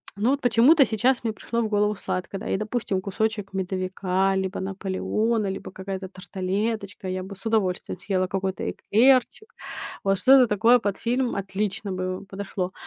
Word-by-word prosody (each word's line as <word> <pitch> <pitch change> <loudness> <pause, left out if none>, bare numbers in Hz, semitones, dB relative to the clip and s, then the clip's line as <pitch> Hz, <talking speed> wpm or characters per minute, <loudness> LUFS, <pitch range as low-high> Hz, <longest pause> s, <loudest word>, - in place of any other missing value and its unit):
но 210 +4 +1
вот 280 0 0
почему-то 260 +5 +6
сейчас 240 +4 +1
мне 225 - -1
пришло 230 +3 -3
в 225 - 0
голову 210 0 +2
сладкое, 185 0 -4
да. - - -7
И, - - +1
допустим, 215 -3 -2
кусочек 205 +1 -2
"Медовика", 190 0 0
либо 190 0 -2
"Наполеона", 200 +3 -1
либо 195 0 -5
какая-то 190 0 -5
тарталеточка. 195 +2 -3
Я 185 0 -3
бы 195 +2 -8
с 195 - -7
удовольствием 210 -5 0
съела 185 -2 0
какой-то 190 0 -2
эклерчик. 260 - +2 0.5
Вот 195 -1 +2
что-то 260 +2 +7
такое 225 +4 +5
под 205 -3 -2
фильм 245 +2 0
отлично 200 +1 -3
бы 185 +1 -3
подошло. 195 -2 -4
200 Hz, 160 wpm, -25 LUFS, 190-225 Hz, 0.5 s, что-то